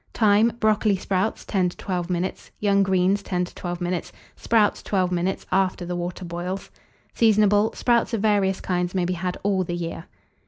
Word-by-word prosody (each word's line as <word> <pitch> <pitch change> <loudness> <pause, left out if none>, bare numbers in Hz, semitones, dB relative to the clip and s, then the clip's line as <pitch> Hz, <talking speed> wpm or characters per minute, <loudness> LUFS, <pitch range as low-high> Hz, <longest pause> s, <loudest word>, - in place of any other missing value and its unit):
Time. 215 +1 +4
Brocoli 215 -2 +2
sprouts, 190 +3 -1
10 185 -3 +1
to - - -13
12 180 -2 -3
minutes; 180 +1 -3
young 200 -1 +3
greens, 190 +1 +2
10 180 -2 -1
to - - -13
12 175 -1 -5
minutes; 175 0 -2 0.2
sprouts, 220 -3 +2
12 185 -3 0
minutes, 180 +2 -1
after 185 -1 +1
the 175 0 -3
water 175 +1 -4
boils. 175 +3 -5 0.4
Seasonable. 210 -1 +4
Sprouts 235 -2 +2
of 225 - -1
various 200 -2 +2
kinds 180 0 -1
may 180 -2 +1
be 180 - -1
had 180 +1 -3
all 195 -2 +1
the 175 0 -4
year. 165 -1 -5
190 Hz, 180 wpm, -24 LUFS, 180-205 Hz, 0.4 s, Time